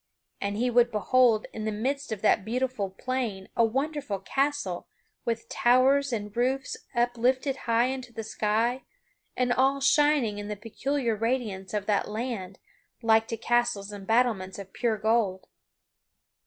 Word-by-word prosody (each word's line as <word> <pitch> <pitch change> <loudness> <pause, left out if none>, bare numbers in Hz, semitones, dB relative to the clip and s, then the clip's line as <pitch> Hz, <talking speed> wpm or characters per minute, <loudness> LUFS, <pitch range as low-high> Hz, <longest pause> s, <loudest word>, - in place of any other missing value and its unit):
And 200 0 -2
he 245 +2 +1
would 240 0 +4
behold 220 +2 +3
in 215 - -5
the 220 - 0
midst 270 +6 -2
of 215 -2 -4
that 210 - +4
beautiful 245 -2 -1
plain 215 -2 -3
a 235 - +4
wonderful 270 -1 -1
castle 270 -3 -1 0.4
with 230 0 -2
towers 265 +2 +3
and 210 -3 -4
roofs 260 +3 0 0.2
uplifted 245 +3 +1
high 230 +1 +4
into 255 -1 -4
the 225 -1 -6
sky, 220 +4 0 0.6
and 250 -1 +2
all 270 +2 +2
shining 275 -6 +3
in 205 - -6
the 210 - -3
peculiar 235 +3 -2
radiance 215 -5 -2
of 205 -1 -1
that 205 -2 +1
land, 215 -4 -4 0.5
like 225 0 +4
to 230 - -3
castles 235 -3 0
and 200 -2 -9
battlements 220 -5 +1
of 195 -1 -9
pure 230 -3 0
gold. 215 -3 +1
230 Hz, 150 wpm, -27 LUFS, 210-255 Hz, 0.6 s, would